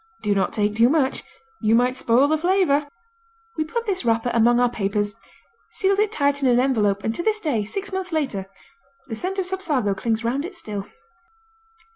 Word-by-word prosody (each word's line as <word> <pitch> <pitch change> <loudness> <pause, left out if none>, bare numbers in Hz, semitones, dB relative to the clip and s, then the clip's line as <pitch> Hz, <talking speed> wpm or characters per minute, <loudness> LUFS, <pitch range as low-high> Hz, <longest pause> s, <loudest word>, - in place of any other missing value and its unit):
Do 205 - +2
not 195 - 0
take 210 -1 0
too 230 +2 +5
much, 285 -2 +1 0.4
you 220 +1 +3
might 250 +2 +2
spoil 255 +2 +3
the 310 - +2
flavor. 320 -4 +2 0.7
We 315 - 0
put 465 +10 -4
this 390 - -1
wrapper 230 +1 +1
among 240 +1 +4
our 245 - +4
papers, 205 -2 -1 0.6
sealed 395 0 +1
it 425 0 +2
tight 285 -6 +1
in 265 - +3
an 245 0 +4
envelope, 210 -7 +1
and 220 - -1
to 345 - -2
this 430 +3 +1
day, 265 - -1
six 395 - -5
months 375 -1 -3
later, 265 -12 -2 0.6
the 225 - -3
scent 370 - -4
of 380 - 0
Sapsago 305 - -1
clings 225 +3 -1
'round 255 +5 -1
it 370 +3 -7
still. 205 - -5
260 Hz, 190 wpm, -23 LUFS, 225-345 Hz, 0.7 s, too